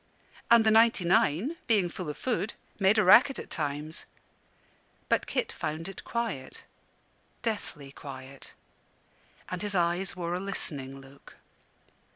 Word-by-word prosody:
And 235 Hz, -1 st, +7 dB
the 220 Hz, -, +4 dB
ninety 225 Hz, -4 st, +5 dB
nine, 185 Hz, -, +2 dB
being 210 Hz, -6 st, +3 dB
full 175 Hz, -1 st, -6 dB
of 150 Hz, -, -5 dB
food, 235 Hz, -4 st, -2 dB, 0.2 s
made 195 Hz, +2 st, +4 dB
a 215 Hz, -, +5 dB
racket 245 Hz, +9 st, +7 dB
at -, -, -8 dB
times; 150 Hz, +1 st, -3 dB, 1.0 s
but -, -, +2 dB
Kit -, -, -1 dB
found 155 Hz, +2 st, -4 dB
it 195 Hz, -, -8 dB
quiet 225 Hz, -, -4 dB, 0.8 s
deathly 170 Hz, -, -4 dB
quiet; 135 Hz, -1 st, -10 dB, 0.9 s
and 180 Hz, -, -4 dB
his 205 Hz, -1 st, -3 dB
eyes 175 Hz, +2 st, +1 dB
wore 175 Hz, -1 st, -3 dB
a 180 Hz, -, -1 dB
listening 140 Hz, -8 st, -4 dB
look. 135 Hz, +1 st, -16 dB
180 Hz, 135 wpm, -29 LUFS, 150-215 Hz, 1.0 s, And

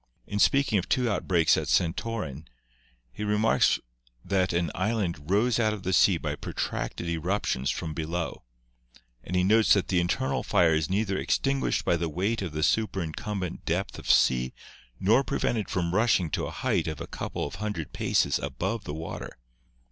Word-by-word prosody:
In 105 Hz, -, -3 dB
speaking 135 Hz, -3 st, +3 dB
of 90 Hz, -, -6 dB
two 125 Hz, -1 st, +2 dB
outbreaks 85 Hz, -5 st, +3 dB
at -, -, -2 dB
Santorin, 80 Hz, -, -1 dB, 0.6 s
he 65 Hz, -, -6 dB
remarks 105 Hz, +1 st, +3 dB, 0.5 s
that 95 Hz, -2 st, +1 dB
an 85 Hz, -3 st, 0 dB
island 90 Hz, -6 st, -2 dB
rose 110 Hz, +5 st, +2 dB
out 110 Hz, -2 st, +2 dB
of 105 Hz, -3 st, -7 dB
the 95 Hz, -, -1 dB
sea 90 Hz, 0 st, +5 dB
by 75 Hz, -2 st, -3 dB
protracted 85 Hz, -, -4 dB
eruptions 85 Hz, -5 st, -1 dB
from 80 Hz, -2 st, -3 dB
below, 80 Hz, +2 st, -3 dB, 0.8 s
and 90 Hz, -, -4 dB
he 90 Hz, -, +3 dB
notes 110 Hz, +3 st, +5 dB
that 100 Hz, -, +1 dB
the 90 Hz, -, +3 dB
internal 80 Hz, -6 st, 0 dB
fire 85 Hz, -2 st, +3 dB
is 80 Hz, -1 st, 0 dB
neither 100 Hz, 0 st, 0 dB
extin 135 Hz, 0 st, +1 dB
guished -, -, 0 dB
by 85 Hz, -, +2 dB
the 85 Hz, -1 st, -2 dB
weight 100 Hz, +8 st, -1 dB
of 95 Hz, -4 st, -3 dB
the 75 Hz, 0 st, -2 dB
superincumbent 95 Hz, -1 st, -1 dB
depth -, -, -2 dB
of -, -, -8 dB
sea 65 Hz, 0 st, +3 dB, 0.4 s
nor 115 Hz, +8 st, +4 dB
prevented 115 Hz, -5 st, -1 dB
from 85 Hz, -2 st, -1 dB
rushing 95 Hz, -6 st, +2 dB
to -, -, -1 dB
a -, -, -5 dB
height -, -, -1 dB
of -, -, -4 dB
a -, -, -5 dB
couple -, -, -4 dB
of 70 Hz, -, -7 dB
hundred 105 Hz, -8 st, -4 dB
paces -, -, +1 dB
above 100 Hz, +3 st, -3 dB
the 75 Hz, -, -5 dB
water. 80 Hz, +1 st, -7 dB
90 Hz, 175 wpm, -27 LUFS, 80-105 Hz, 0.8 s, sea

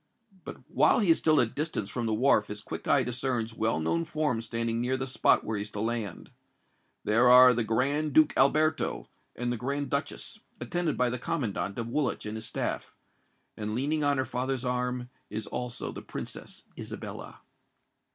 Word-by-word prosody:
But -, -, -10 dB
while -, -, +4 dB
he 205 Hz, -8 st, +4 dB
is 165 Hz, -, +4 dB
still 155 Hz, -2 st, +4 dB
at 120 Hz, -, +5 dB
a -, -, -18 dB
distance 150 Hz, -9 st, -2 dB
from 120 Hz, +2 st, -3 dB
the 110 Hz, -, 0 dB
wharf 110 Hz, -3 st, +3 dB
his 105 Hz, 0 st, -6 dB
quick -, -, -7 dB
eye 140 Hz, -, +4 dB
discerns 125 Hz, -2 st, -2 dB
well 110 Hz, -4 st, 0 dB
known 80 Hz, +1 st, 0 dB
forms 145 Hz, -, -1 dB
standing 115 Hz, 0 st, -1 dB
near 130 Hz, +2 st, 0 dB
the 130 Hz, -, -2 dB
spot 130 Hz, -, +3 dB
where 110 Hz, -1 st, -2 dB
he -, -, -2 dB
is 105 Hz, -, -5 dB
to 105 Hz, -, -6 dB
land. 110 Hz, -3 st, -3 dB, 0.7 s
There 115 Hz, +4 st, +4 dB
are 125 Hz, 0 st, +9 dB
the 120 Hz, -1 st, +1 dB
Grand 140 Hz, +7 st, +1 dB
Duke 155 Hz, -1 st, +5 dB
Alberto 155 Hz, +3 st, +2 dB, 0.3 s
and 120 Hz, 0 st, -2 dB
the 120 Hz, -, -2 dB
Grand 140 Hz, +3 st, -3 dB
Duchess, 145 Hz, +10 st, -3 dB, 0.2 s
attended 175 Hz, -4 st, -1 dB
by 125 Hz, -1 st, +2 dB
the 125 Hz, -, -3 dB
commandant 115 Hz, -, -2 dB
of 115 Hz, -1 st, -3 dB
Woolwich 125 Hz, 0 st, -1 dB
and 105 Hz, +1 st, -4 dB
his 110 Hz, 0 st, -4 dB
staff; -, -, -3 dB, 0.6 s
and 105 Hz, 0 st, -3 dB
leaning 150 Hz, +5 st, 0 dB
on 145 Hz, -1 st, +2 dB
her 130 Hz, -, 0 dB
father's 130 Hz, +1 st, -2 dB
arm, 125 Hz, 0 st, -2 dB, 0.2 s
is 110 Hz, +2 st, -4 dB
also 125 Hz, -1 st, -4 dB
the -, -, -8 dB
Princess -, -, -7 dB, 0.2 s
Isabella. -, -, -8 dB
125 Hz, 190 wpm, -29 LUFS, 115-140 Hz, 0.7 s, are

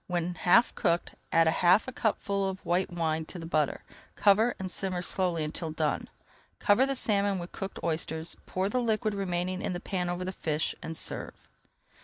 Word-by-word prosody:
When 175 Hz, -1 st, -1 dB
half 180 Hz, +7 st, +4 dB
cooked, 170 Hz, -4 st, 0 dB, 0.2 s
add 165 Hz, 0 st, +5 dB
half 175 Hz, +6 st, +4 dB
a -, -, -3 dB
cupful 200 Hz, -4 st, 0 dB
of 190 Hz, 0 st, -7 dB
white 180 Hz, +2 st, +1 dB
wine 160 Hz, -2 st, -1 dB
to 180 Hz, -, -8 dB
the 165 Hz, -, -7 dB
butter, 155 Hz, -3 st, 0 dB, 0.3 s
cover, 215 Hz, +4 st, +4 dB
and 190 Hz, -1 st, -4 dB
simmer 185 Hz, -2 st, -1 dB
slowly 175 Hz, -3 st, 0 dB
until 155 Hz, +2 st, -3 dB
done. 155 Hz, -1 st, -1 dB, 0.5 s
Cover 225 Hz, +7 st, +4 dB
the 275 Hz, -, 0 dB
salmon 200 Hz, -5 st, +2 dB
with 175 Hz, 0 st, -6 dB
cooked 195 Hz, 0 st, -6 dB
oysters, 160 Hz, 0 st, -1 dB
pour 185 Hz, +1 st, -1 dB
the 250 Hz, +5 st, 0 dB
liquid 220 Hz, -2 st, 0 dB
remaining 185 Hz, -1 st, -2 dB
in -, -, -2 dB
the 175 Hz, -, -3 dB
pan 180 Hz, -1 st, -2 dB
over 175 Hz, +1 st, -2 dB
the 185 Hz, -, -2 dB
fish, 155 Hz, -4 st, -1 dB
and 160 Hz, 0 st, -4 dB
serve. -, -, -3 dB
180 Hz, 185 wpm, -29 LUFS, 165-200 Hz, 0.5 s, add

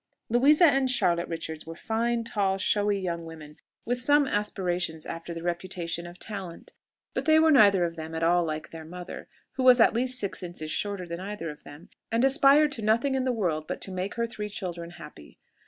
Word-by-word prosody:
Louisa 285 Hz, +8 st, +5 dB
and 270 Hz, -4 st, +3 dB
Charlotte 175 Hz, -8 st, +2 dB
Richards 160 Hz, -1 st, -6 dB
were 165 Hz, -, -7 dB
fine, 230 Hz, +4 st, -1 dB
tall, 200 Hz, -4 st, 0 dB
showy 205 Hz, +1 st, +1 dB
young 170 Hz, -3 st, -3 dB
women, 155 Hz, -2 st, -11 dB, 0.3 s
with 245 Hz, +1 st, -1 dB
some 290 Hz, +2 st, +4 dB
aspirations 180 Hz, -, -1 dB
after 165 Hz, +1 st, -7 dB
the 165 Hz, 0 st, -6 dB
reputation 175 Hz, -1 st, -3 dB
of 175 Hz, +1 st, -12 dB
talent; 195 Hz, -6 st, -8 dB, 0.4 s
but -, -, -3 dB
they 315 Hz, 0 st, +5 dB
were 320 Hz, 0 st, +5 dB
neither 200 Hz, -, +5 dB
of 165 Hz, 0 st, -4 dB
them 160 Hz, 0 st, -6 dB
at 160 Hz, -, -2 dB
all 175 Hz, +1 st, +3 dB
like 155 Hz, -1 st, -5 dB
their 165 Hz, -1 st, -9 dB
mother, 180 Hz, +3 st, -9 dB, 0.3 s
who 260 Hz, -, 0 dB
was 255 Hz, -1 st, +7 dB
at 225 Hz, -, +5 dB
least 250 Hz, +2 st, +2 dB
six 200 Hz, -3 st, -2 dB
inches 170 Hz, -3 st, -6 dB
shorter 200 Hz, -1 st, -3 dB
than 170 Hz, 0 st, -6 dB
either 190 Hz, -4 st, -5 dB
of 150 Hz, -, -14 dB
them, 145 Hz, +4 st, -12 dB, 0.2 s
and 230 Hz, +3 st, +2 dB
aspired 280 Hz, +2 st, +5 dB
to 260 Hz, -5 st, -5 dB
nothing 230 Hz, +6 st, +1 dB
in 260 Hz, -1 st, 0 dB
the 255 Hz, -, +1 dB
world 170 Hz, -9 st, -2 dB
but -, -, -4 dB
to 195 Hz, -, -3 dB
make 185 Hz, +2 st, -4 dB
her 235 Hz, 0 st, 0 dB
three 210 Hz, -2 st, -6 dB
children 175 Hz, -4 st, -6 dB
happy. 150 Hz, -, -13 dB
190 Hz, 205 wpm, -27 LUFS, 170-235 Hz, 0.4 s, was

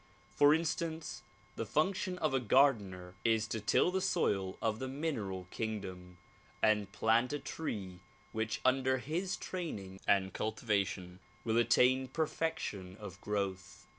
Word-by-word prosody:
For 145 Hz, 0 st, +7 dB
instance, 160 Hz, 0 st, -1 dB, 0.3 s
the -, -, -2 dB
function 180 Hz, -, 0 dB
of 155 Hz, -5 st, 0 dB
a 135 Hz, -, +3 dB
gardener 105 Hz, -8 st, +3 dB
is 110 Hz, -2 st, +3 dB
to 110 Hz, -, -2 dB
till 110 Hz, -, +3 dB
the 190 Hz, +1 st, 0 dB
soil 95 Hz, -, +1 dB
of 110 Hz, -1 st, 0 dB
the 130 Hz, -, -3 dB
mineral 125 Hz, -, -3 dB
kingdom 95 Hz, -5 st, -5 dB, 0.4 s
and 105 Hz, -2 st, +2 dB
plant 115 Hz, +5 st, +2 dB
a -, -, +1 dB
tree 95 Hz, -, -5 dB, 0.3 s
which 110 Hz, 0 st, -2 dB
under 130 Hz, 0 st, +3 dB
his 165 Hz, +8 st, -2 dB
training 100 Hz, -, -5 dB
and 95 Hz, -1 st, +3 dB
cultivation 100 Hz, -5 st, -1 dB, 0.2 s
will 115 Hz, 0 st, +1 dB
attain 125 Hz, +3 st, +4 dB
perfection 135 Hz, -, -2 dB
of 95 Hz, -2 st, -9 dB
growth. 100 Hz, -3 st, -3 dB
110 Hz, 135 wpm, -34 LUFS, 95-145 Hz, 0.4 s, For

